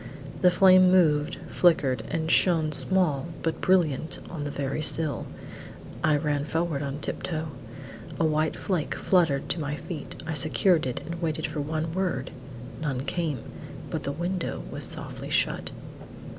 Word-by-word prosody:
The 180 - +7
flame 185 0 +6
moved, 155 -5 +3
flickered, 150 -7 +3
and 160 0 -1
shone 165 -4 +3
small 160 -3 +1 0.2
but 165 - -1
brilliant 165 -5 +2
on 155 -4 -4
the - - -2
very 140 +1 -2
sill. 155 -3 +1 0.8
I 155 -1 +4
ran 145 -1 0
forward 160 -2 -1
on 140 0 -3
tip - - -4
toe. 160 -2 -3 0.7
A 165 - +3
white 155 0 +1
flake 180 -6 -2
fluttered 160 -7 +2
to 165 - 0
my 145 0 -2
feet. 155 -1 -7
I 160 - -3
secured 160 +1 +2
it 125 - -3
and 170 +1 -6
waited 160 -3 -1
for 155 -1 -3
one 155 +2 -2
word; 180 -8 -1 0.5
none 135 -5 -1
came; 150 -2 -2 0.5
but - - -2
the 140 - -3
window 175 +4 -3
was - - -4
softly - - -1
shut. - - 0
155 Hz, 155 wpm, -27 LUFS, 145-175 Hz, 0.8 s, The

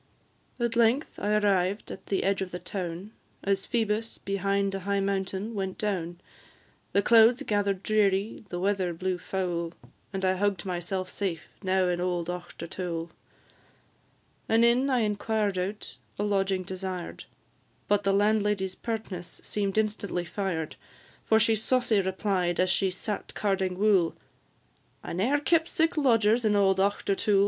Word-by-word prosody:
At 235 -1 0
length 235 +5 +2
I 210 +1 +1
arrived 200 -1 +1
at 190 - -9
the 195 - 0
edge 195 0 +1
of 190 - -2
the 180 - -5
town, 180 +1 -5 0.3
As 195 0 0
Phoebus, 225 -2 -1
behind 195 0 0
a 195 - -2
high 200 +1 0
mountain, 195 +2 -2
went 190 -3 -3
down; 175 -5 -2 0.7
The 200 - +2
clouds 235 +4 +6
gather'd 200 -4 0
dreary, 205 -1 +1
and 175 0 -4
weather 190 -3 0
blew 185 +1 -2
foul, 175 -3 -2 0.4
And 195 -1 -2
I 185 0 +2
hugg'd 200 -2 0
myself 185 +1 -2
safe 185 -4 -4
now 190 -1 +2
in 175 0 0
old 175 -1 -1
Auchtertool. 170 -1 -5 1.4
An 225 +1 +4
inn 245 +4 +4
I 255 -3 +2
inquired 210 -2 0
out, 200 +3 -4 0.2
a 205 - -1
lodging 195 -2 +1
desired, 185 -1 -5 0.6
But 205 0 +3
the 195 - +2
landlady's 205 -1 +2
pertness 190 -5 -5
seem'd 200 -1 -2
instantly 205 -4 -1
fired; 170 -3 -3 0.5
For 220 - +4
she 225 +1 +4
saucy 225 -1 +2
replied, 190 -2 0
as 185 0 +3
she 190 0 +2
sat 200 +3 -5
carding 190 -3 0
wool, 195 -5 +3 0.9
"I - - -5
ne'er 230 +12 +2
kept 320 +3 +2
sic 325 +2 +1
lodgers 235 -5 +3
in 215 -1 +3
auld 195 -1 +3
Auchtertool." 200 0 +2
195 Hz, 145 wpm, -28 LUFS, 185-215 Hz, 1.4 s, clouds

